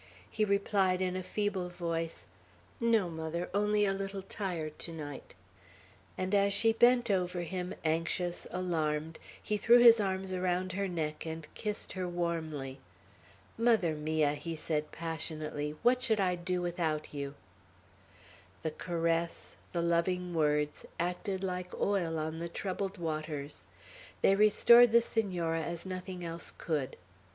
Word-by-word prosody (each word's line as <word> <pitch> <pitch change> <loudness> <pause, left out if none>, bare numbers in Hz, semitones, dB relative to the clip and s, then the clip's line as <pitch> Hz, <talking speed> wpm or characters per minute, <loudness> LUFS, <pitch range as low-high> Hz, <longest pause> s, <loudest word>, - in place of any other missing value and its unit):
he 215 - +1
replied 200 -2 +2
in 185 -1 0
a 185 - -2
feeble 195 -1 -2
voice, 165 -2 -3 0.5
"No, 230 -5 +3
mother, 165 +1 -4
only 210 +1 +2
tired 195 - +2
a 195 - -5
little 195 0 -4
to 170 -6 -4
night;" 145 -9 -8 0.8
and 185 +1 -2
as 200 0 +4
she 225 +3 +4
bent 240 0 +4
over 180 -2 0
him, 180 +2 -4
anxious, 165 +2 -1
alarmed, 160 -3 -1 0.2
he 210 - -1
threw 235 +4 +6
his 235 -1 +8
arms 190 -1 -1
around 185 0 0
her 195 +2 -1
neck 160 -3 -3
and 160 -1 -5
kissed 210 -1 -4
her 185 -1 -3
warmly. 160 -6 -3 0.8
"Mother 225 -8 +3
mia!" 155 -1 +1
he 160 +3 -5
said 155 -1 -2
passionately, 155 -2 -3
"what 250 +1 +4
should 220 -4 +2
I 185 -2 +2
do 180 0 -2
without 165 -4 -2
you?" 140 -1 -4 1.3
The 160 - -1
caress, 165 0 -2 0.2
the 170 -1 -1
loving 175 +1 +1
words, 150 -2 +1 0.2
acted 185 +3 -2
like 180 -1 -4
oil 175 -5 +1
on 160 +1 -3
the 170 0 -4
troubled 195 +2 -3
waters. 155 - -4 0.6
They 195 - +6
restored 225 +3 +7
the 235 - +7
Senora 175 -8 -1
as 170 +2 -4
nothing 185 -1 -5
else 165 0 -5
could. 150 -6 -2
175 Hz, 140 wpm, -32 LUFS, 160-195 Hz, 1.3 s, his